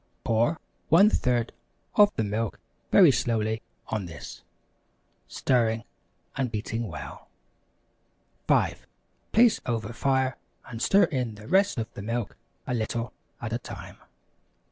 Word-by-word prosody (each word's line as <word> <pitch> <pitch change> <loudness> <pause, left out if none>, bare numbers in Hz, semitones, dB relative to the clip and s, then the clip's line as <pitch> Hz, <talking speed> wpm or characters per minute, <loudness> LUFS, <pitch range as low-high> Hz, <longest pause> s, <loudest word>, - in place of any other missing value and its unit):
Pour 115 +8 +1 0.3
1/3 125 - +4 0.4
of 205 -1 +6
the 110 - 0
milk 110 +1 -2 0.3
very - - +8
slowly 110 -1 0 0.3
on 105 -5 -2
this, 85 - -9 0.9
stirring 115 -3 +1 0.5
and 130 -2 0
beating 115 +1 -3
well. 80 -7 -9 1.2
5. - - +1 0.4
Place 230 0 +5
over 115 -1 -2
fire 130 0 +1 0.3
and 115 -1 -7
stir 200 +10 +5
in 125 -6 -1
the 105 +1 -12
rest 190 -1 +3
of 115 -1 -4
the - - -7
milk 115 0 -3 0.3
a - - -2
little 115 +1 -2 0.3
at 115 -1 -4
a 120 - -1
time. - - -9
115 Hz, 120 wpm, -27 LUFS, 110-130 Hz, 1.2 s, very